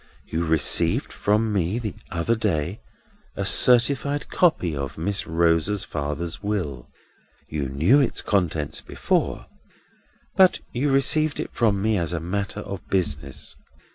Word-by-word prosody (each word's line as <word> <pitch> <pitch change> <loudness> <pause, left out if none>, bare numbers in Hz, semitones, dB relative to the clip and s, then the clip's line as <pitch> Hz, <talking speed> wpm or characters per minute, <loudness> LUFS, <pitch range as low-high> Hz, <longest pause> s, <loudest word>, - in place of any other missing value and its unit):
You 85 +1 -3
received 80 -1 +3
from 105 +1 0
me, 95 +2 0
the 115 -4 -4 0.2
other 85 +6 0
day, 95 -4 -2 0.5
a - - -3
certified 140 +4 +3
copy 95 - +1
of 70 -1 -5
Miss 100 +5 -2
Rosa's 85 +4 +1
father's 75 +3 -4
will. 90 -12 -3 0.6
You 70 -3 -3
knew 80 - +3
its 135 - -1
contents 85 -7 -1
before, - - -2 0.9
but 190 -1 +5
you 135 +4 0
received 145 +3 +2
it - - -5
from 105 -5 +1
me 110 -2 +1
as 85 0 -2
a 85 - -1
matter 100 +5 -4
of 100 -2 -8
business. 75 -7 -2
95 Hz, 135 wpm, -23 LUFS, 80-115 Hz, 0.9 s, but